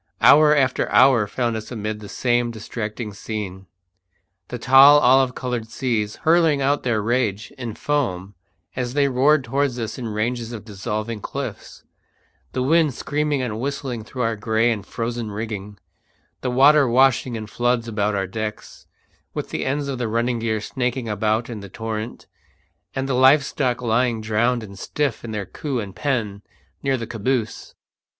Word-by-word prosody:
Hour 150 0 +7
after 130 -3 +1
hour 130 -5 +5
found 120 +2 -1
us 110 +2 -6
amid 110 -2 -4
the 105 -1 -10
same 120 -1 +1
distracting 110 -1 -5
scene: 100 -3 -6 0.8
the - - -5
tall 135 +3 +7
olive 130 -1 +4
coloured 120 -3 -3
seas 110 -6 -1
hurling 160 -3 +4
out 140 +2 +1
their 110 -4 0
rage 110 -3 -1
in 120 -4 -6
foam 100 -10 -2 0.4
as 125 0 -3
they 145 -1 +3
roared 140 +3 +3
towards 135 +1 -1
us 115 +1 -4
in 120 - -4
ranges 115 +2 -2
of 110 -2 -8
dissolving 105 +1 -4
cliffs; - - -6 0.7
the 130 - -1
wind 155 -1 +3
screaming 145 -1 -1
and 110 -3 -3
whistling 130 -3 -3
through 125 +3 -4
our 115 0 0
grey 110 +2 +1
and 105 -3 -4
frozen 115 -1 -3
rigging; 105 -1 -6 0.6
the 130 - -1
water 140 +3 +5
washing 125 0 +3
in 110 -1 -5
floods 120 +2 0
about 105 -2 -1
our 95 -1 0
decks, 105 +2 -6 0.5
with - - -4
the - - -2
ends 140 +1 -1
of 135 -2 -4
the 120 - -1
running 115 +2 0
gear 110 -1 -1
snaking 125 +2 -3
about 110 +2 0
in 115 -3 -6
the 100 -1 -10
torrent, 110 +2 -5 0.7
and 135 0 -2
the 135 - -1
live 135 +3 +5
stock 125 -4 -1
lying 120 0 +1
drowned 110 +2 0
and 100 -2 -11
stiff 145 0 -2
in 120 - -6
their 105 -2 -3
coops 130 -2 -4
and 95 -2 -10
pen 110 -8 -2 0.4
near 135 -1 +1
the 115 - -5
caboose. 115 +1 -3
120 Hz, 165 wpm, -22 LUFS, 110-130 Hz, 0.8 s, Hour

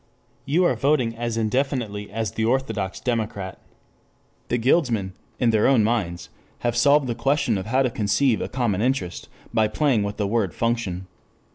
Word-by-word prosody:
You 160 +6 +3
are - - +3
voting 135 -5 +1
as 115 0 -3
indefinitely 115 -3 -1
as 110 +1 -3
the 110 - -2
orthodox 110 -5 -1
democrat. 110 -6 -3
6 - - -31 0.7
The 120 - 0
guildsmen 115 - +1 0.3
in 120 -3 +3
their 110 -1 +3
own 130 -5 +4
minds 105 -7 -1 0.3
have 120 -1 0
solved 140 +3 +4
the 120 - -1
question 135 0 +1
of 95 +1 -4
how 130 +4 +2
to 130 - 0
conceive 115 +3 +1
a - - -3
common 120 -6 0
interest 120 -8 -2 0.2
by 110 -1 +3
playing 125 0 +1
with 100 +1 -3
the 105 - 0
word 100 -3 0
function. 115 -6 -1
115 Hz, 170 wpm, -23 LUFS, 105-130 Hz, 0.7 s, own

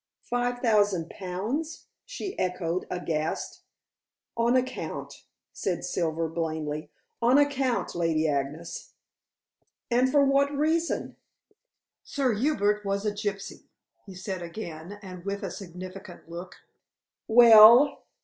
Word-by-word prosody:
"Five 245 0 -2
thousand 205 -7 +2
pounds!" 215 - -4 0.2
she 460 -6 -5
echoed, 180 -1 -2
aghast. 160 -3 -3 0.7
"On 235 +1 +2
account," 255 0 -3 0.3
said 175 -3 -3
Silver 165 -2 -1
blandly. 155 -2 -4 0.3
"On 245 +4 +5
account, 275 -4 +1
Lady 165 -2 +1
Agnes." 145 +3 -4 1.0
"And 250 +2 +3
for 285 0 +4
what 275 +1 +3
reason?" 325 +3 0 0.9
"Sir 270 -4 0
Hubert 210 -4 +1
was 200 +1 -2
a 210 - +1
gypsy," 205 -1 -5 0.4
he 190 - -10
said 190 0 -5
again, 170 0 -7
and 185 -2 -9
with 200 +1 -4
a 190 - -4
significant 185 0 -10
look. 175 +2 -8 0.7
"Well?" 235 +3 +8
200 Hz, 110 wpm, -27 LUFS, 170-245 Hz, 1.0 s, Well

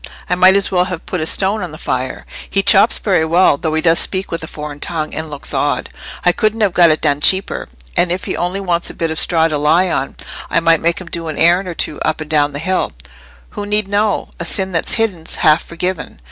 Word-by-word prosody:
I - - 0
might 185 +1 +5
as 200 0 +2
well 180 -1 +2
have 180 -3 -6
put 180 - -3
a 155 - +1
stone 200 +5 +3
on 180 -3 -5
the 155 - -9
fire. 130 -4 -4 0.2
He 195 - +1
chops 215 +3 +5
very 185 -6 +1
well, 165 0 +3
though 160 0 -2
he 160 - 0
does 165 -1 +4
speak 190 0 -2
with 165 -1 -4
a - - -6
foreign 150 -1 -8
tongue, 155 -1 -4
and 160 0 -5
looks 145 -2 -4
odd. - - -1 0.3
I 180 - +6
couldn't 215 +4 -1
have 200 -4 +2
got 175 -2 +5
it 155 - +1
done 145 -2 +1
cheaper. 190 - +2 0.3
And 175 - +2
if 180 +1 -2
he - - -3
only 180 +3 -2
wants 175 -3 -1
a - - -10
bit 165 -1 -2
of 160 - -2
straw 165 -2 +3
to 150 -2 -2
lie 170 +5 +2
on, 135 -3 -2 0.3
I - - +2
might 165 -1 +3
make 170 +1 +1
him 185 - -9
do 165 -1 -4
an 155 - -5
errand 175 +3 +3
or 175 - -5
two 150 - -2
up 155 - -1
and 155 -1 -7
down 145 -1 +2
the - - -4
hill. 185 +5 -1 0.6
Who 205 - -5
need 210 -1 0
know? 205 +1 0
And 170 - -3
sin 190 -1 -1
that's 165 -2 0
hidden's 195 -8 -1
half 155 +1 +3
forgiven. 180 +1 -5
170 Hz, 250 wpm, -16 LUFS, 160-190 Hz, 0.6 s, I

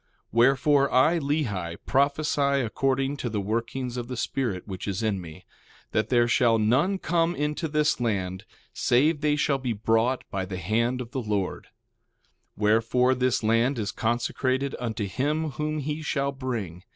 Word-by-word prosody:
1:6 - - -44 0.2
Wherefore, 135 +4 +3
I, 155 +7 +4
Lehi, 110 - -2
prophesy 140 -1 +1
according 135 +4 0
to 125 - -3
the 105 -2 -2
workings 115 +5 -3
of 120 -1 -4
the 125 -1 -5
Spirit 115 -6 -2
which 95 -1 -6
is 100 +2 -2
in 105 -4 0
me, 85 +2 -11 0.5
that 110 0 0
there 120 -2 +4
shall 120 -1 +3
none 130 - +2
come 170 -1 0
into 150 +3 -2
this 150 -2 +1
land 95 -6 -2 0.3
save 145 +5 +2
they 150 -1 +2
shall 140 -1 +1
be 125 -3 -2
brought 115 +4 +1
by 95 -1 -2
the 95 0 -5
hand 115 +7 0
of 120 -1 -8
the 135 - -2
Lord. 105 -4 -2
1:7 - - -27 0.9
Wherefore, 115 +4 +3
this 125 -2 0
land 115 +5 +2
is 105 -2 -2
consecrated 130 +3 -1
unto 115 -3 -3
him 150 - -1
whom 150 +4 -3
he 150 +1 -3
shall 140 -2 -1
bring. 120 -11 -4
125 Hz, 165 wpm, -26 LUFS, 110-140 Hz, 0.9 s, I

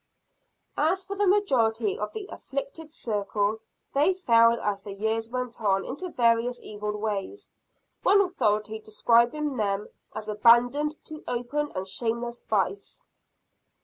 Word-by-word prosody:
As 360 +6 +2
for 395 +2 -5
the 410 0 +1
majority 360 - +2
of - - -3
the 430 -3 -6
"afflicted 420 -12 -6
circle," 210 -3 -1 0.3
they 305 +7 +3
fell 230 -9 +4
as 200 -1 -2
the 200 0 -8
years 220 +2 -1
went 250 -1 -4
on 195 -2 +1
into 355 +8 -5
various 235 -2 +2
evil 210 0 -5
ways 210 - -4 0.5
one 400 +1 +5
authority 220 - 0
describing 235 +6 +2
them 205 -1 -1 0.3
as 215 0 -5
"abandoned 245 +8 +4
to 310 -1 -9
open 250 +5 -2
and 185 +1 -3
shameless 235 +3 -2
vice." 200 -1 -2
235 Hz, 130 wpm, -27 LUFS, 215-300 Hz, 0.5 s, one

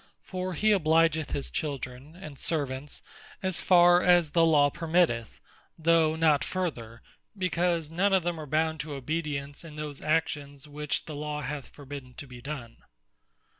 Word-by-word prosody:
For 185 -1 -4
he 215 +7 +3
obligeth 160 -3 +3
his 140 - -4
Children, 140 0 -5
and 155 -7 -10
Servants, 145 -3 -3 0.4
as 190 -2 0
farre 175 -1 +6
as 175 -4 +4
the 165 +1 +4
Law 145 -3 +5
permitteth, 160 - 0 0.4
though 160 -1 +3
not 155 -3 +3
further, 120 -11 -4 0.3
because 175 -3 0
none 190 +5 +2
of 190 -2 +3
them 175 -1 -2
are 155 - -7
bound 160 +2 0
to 150 0 -5
obedience 145 0 -4
in 160 -3 -10
those 150 -2 -6
actions, 150 -2 -1
which 150 0 -3
the 155 - -7
Law 150 0 -4
hath 140 +1 -5
forbidden 140 -3 -10
to 145 - -8
be 125 -2 -11
done. 130 -4 -7
155 Hz, 155 wpm, -28 LUFS, 145-170 Hz, 0.4 s, farre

